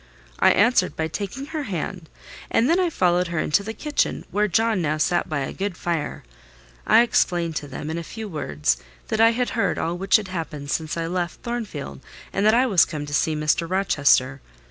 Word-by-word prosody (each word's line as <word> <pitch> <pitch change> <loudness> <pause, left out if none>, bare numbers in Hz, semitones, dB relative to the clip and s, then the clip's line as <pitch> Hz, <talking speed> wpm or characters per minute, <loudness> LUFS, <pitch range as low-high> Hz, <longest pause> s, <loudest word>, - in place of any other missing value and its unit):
I - - +6
answered 205 -3 +3
by 160 - -1
taking 205 - -5
her 310 +1 -4
hand; 180 - -5 0.4
and 230 - +2
then 335 +4 +3
I 360 -2 +2
followed 180 - +2
her 170 -1 -4
into 155 +4 +2
the 210 +2 -5
kitchen, 300 -2 -1
where 210 +1 +2
John 220 +1 +1
now 155 -1 0
sat 175 +3 +1
by 155 -2 -1
a 135 - -4
good 195 -2 -3
fire. 170 -3 -3 0.6
I 235 - +7
explained 175 -8 +1
to 145 - -5
them, 150 +2 -6
in 170 +1 -3
few 220 +6 -7
words, 75 - -1 0.3
that 220 - +1
I 225 - +7
had 245 +2 -1
heard 230 - 0
all 165 +2 -1
which 190 +1 +2
had 210 -4 +2
happened 155 -5 -5
since 160 0 -2
I 165 - -1
left 175 0 -3
Thornfield, 225 - -5 0.3
and 195 - 0
that 215 - +5
I 250 +2 +4
was 195 -9 +5
come 150 -3 -4
to 145 - -8
see 155 +2 +1
Mr. 155 +2 0
Rochester. 140 -8 +2
175 Hz, 205 wpm, -23 LUFS, 155-220 Hz, 0.6 s, I